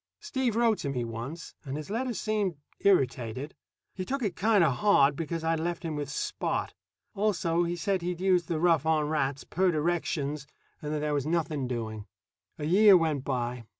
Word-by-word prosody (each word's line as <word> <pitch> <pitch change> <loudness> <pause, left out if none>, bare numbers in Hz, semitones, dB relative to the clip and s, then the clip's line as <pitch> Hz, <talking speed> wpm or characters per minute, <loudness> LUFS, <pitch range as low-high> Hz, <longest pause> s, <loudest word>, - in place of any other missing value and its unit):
Steve 255 -4 -1
wrote 230 -2 +3
to 140 - -3
me 125 -3 -2
once, 120 +9 -6
and 140 -1 -4
his 155 +5 -7
letter 250 +3 -1
seemed 210 -4 -1 0.2
irritated. 130 - +1 0.4
He 185 - -4
took 270 +6 -3
it 200 -5 -1
kind 210 -1 +3
of 135 -6 +2
hard 145 -9 +4
because 165 +1 -3
I'd 165 0 +1
left 170 +2 -3
him 160 -2 -3
with 145 -2 -4
Spot. - - -2 0.4
Also, 175 -5 +1
he 170 +1 -2
said 185 +2 -1
he'd 175 0 -3
used 180 -3 +2
the 165 -2 -1
"rough 165 -3 +3
on 155 -2 +2
rats," 140 -3 -1
per 185 +2 +1
directions, 150 -3 -1 0.3
and 150 - -4
that 150 -1 -1
there 150 0 -1
was 145 0 -1
nothing 155 -5 -1
doing. 110 -4 -4 0.5
A 150 - -4
year 195 +4 +7
went 155 -5 0
by. 125 -3 -3
160 Hz, 185 wpm, -28 LUFS, 140-185 Hz, 0.5 s, year